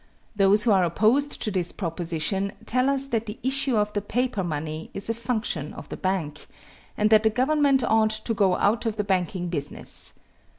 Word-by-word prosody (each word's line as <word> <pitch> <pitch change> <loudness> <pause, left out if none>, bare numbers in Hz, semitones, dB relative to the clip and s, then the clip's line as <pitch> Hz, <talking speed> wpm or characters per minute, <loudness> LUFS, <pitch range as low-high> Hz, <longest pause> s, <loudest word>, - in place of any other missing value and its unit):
Those 200 +1 +4
who 225 - +3
are 190 -2 +4
opposed 225 - +1
to 215 - -2
this 180 -3 0
proposition 175 +2 -3
tell 255 +3 +1
us 275 -1 +3
that 230 -3 -1
the 210 +2 -6
issue 265 -1 +1
of 210 0 0
paper 245 -5 -1
money 155 -1 -4
is 200 +3 -2
a - - -1
function 220 - -3
of - - -10
the - - -5
bank, 175 -6 -3 0.5
and 210 +1 +2
that 215 -1 +7
the 220 - +3
government 270 +3 +2
ought 220 -1 +3
to 220 +1 -1
go 195 -4 +2
out 225 +3 +1
of 220 - -1
the 210 - -1
banking 185 -2 -1
business. 145 -4 -4
210 Hz, 185 wpm, -25 LUFS, 180-230 Hz, 0.5 s, that